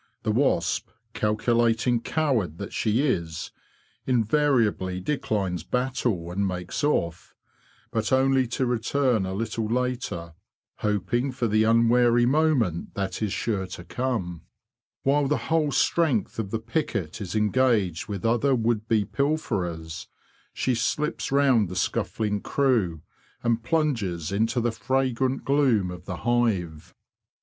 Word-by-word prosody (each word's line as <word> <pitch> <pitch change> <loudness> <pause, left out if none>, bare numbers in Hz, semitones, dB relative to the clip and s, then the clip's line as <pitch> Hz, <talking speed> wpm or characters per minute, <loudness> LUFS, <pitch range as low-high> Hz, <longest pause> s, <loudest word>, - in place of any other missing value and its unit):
The 110 - +1
wasp, 130 +6 +1 0.2
calculating 115 +2 +1
coward 115 - 0
that 100 - -7
she 115 +6 +1
is, 85 - -2 0.6
invariably 115 -7 +2
declines 95 - -1
battle, 125 -6 -1
and 100 +2 0
makes 90 +4 -4
off; 85 - -1 0.6
but 110 -2 -1
only 130 -1 +3
to 130 +3 -1
return 120 -2 +1
a 95 - -3
little 115 +1 -2
later, 120 -9 -2 0.4
hoping 105 +6 0
for 125 -2 -1
the 110 0 +3
unwary 120 +1 +4
moment 130 - +1
that 100 +1 -3
is 105 -3 0
sure 100 -4 -1
to 90 -1 -8
come. 95 -6 -3 0.6
While 140 +1 +2
the 150 - +1
whole 160 -3 0
strength 140 - +1
of 105 -3 -2
the 115 - -1
picket 110 - -3
is 95 -1 -5
engaged 105 -6 +1
with 100 0 -5
other 120 +4 +3
would 115 -2 0
be 110 -3 +2
pilferers, 90 - -2 0.4
she 130 - 0
slips 150 +6 -1
round 135 -8 +3
the 90 - -6
scuffling 105 +3 -1
crew, 110 - +1 0.4
and 115 -1 +1
plunges 115 - -1
into 110 +5 +1
the 120 0 +1
fragrant 130 +2 -1
gloom 130 -10 +2
of 90 0 -9
the 90 -3 -5
hive. 100 -10 0
115 Hz, 130 wpm, -25 LUFS, 95-130 Hz, 0.6 s, unwary